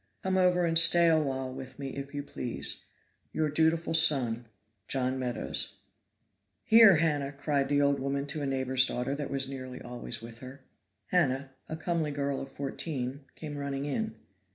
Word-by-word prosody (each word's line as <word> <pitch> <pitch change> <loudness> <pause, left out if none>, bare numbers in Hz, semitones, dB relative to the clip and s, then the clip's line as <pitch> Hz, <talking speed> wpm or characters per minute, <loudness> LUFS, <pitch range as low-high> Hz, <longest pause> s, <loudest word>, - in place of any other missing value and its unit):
Come 190 0 0
over 180 -1 +3
and 165 -1 +5
stay 170 0 +7
awhile 135 -5 0
with 130 -1 -9
me, 140 -1 -5
if 140 +1 -7
you 145 0 -4
please. 125 -4 -1 0.5
"Your 155 -1 0
dutiful 160 +2 +1
son, 120 -7 +4 0.4
JOHN 130 0 -1
MEADOWS" 125 -2 -3 0.9
"Here, 225 -4 +7
Hannah," 145 -3 0
cried 140 -1 -1
the 145 0 +3
old 140 -1 +2
woman 140 +1 -2
to 150 +1 -3
a 140 - -2
neighbor's 130 -1 +2
daughter 125 +3 -2
that 145 -1 -4
was 135 -1 -1
nearly 130 -2 -7
always 120 -1 -5
with 115 +1 -11
her. 130 +2 -11 0.5
Hannah, 140 -6 +1 0.2
a 155 - -4
comely 165 -1 -1
girl 140 -1 -2
of 135 - -8
fourteen, 135 -1 -4
came 150 -2 -7
running 140 0 -3
in. 220 +9 -3
140 Hz, 165 wpm, -29 LUFS, 130-160 Hz, 0.9 s, stay